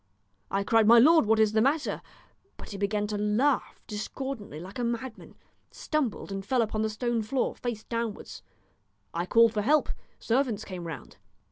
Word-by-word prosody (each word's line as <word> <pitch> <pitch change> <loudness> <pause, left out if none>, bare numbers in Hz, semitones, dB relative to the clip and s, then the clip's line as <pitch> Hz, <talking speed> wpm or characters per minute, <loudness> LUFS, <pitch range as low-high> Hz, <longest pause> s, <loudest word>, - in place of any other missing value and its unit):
I 195 0 0
cried, 225 +1 +3
'My 235 +1 +8
lord, 310 +1 +6
what 220 0 +3
is 215 -1 +4
the 220 0 +2
matter?' 285 +5 0 0.6
but - - -10
he 200 - -6
began 205 +1 0
to 210 0 -3
laugh 230 +7 +1
discordantly 215 - -6
like 190 +7 -9
a - - -1
madman, 235 0 -4 0.3
stumbled, 275 -10 -3
and 195 0 -4
fell 245 +3 +2
upon 215 0 -2
the 220 - 0
stone 235 +1 -1
floor, 245 +4 -1
face 235 -3 -4
downwards. 230 -2 -5 0.7
I 170 +2 -2
called 230 +1 +5
for 210 - 0
help; 295 +8 +2 0.3
servants 235 -3 0
came 180 -3 -7
round. 165 - -8
220 Hz, 170 wpm, -28 LUFS, 210-245 Hz, 0.7 s, My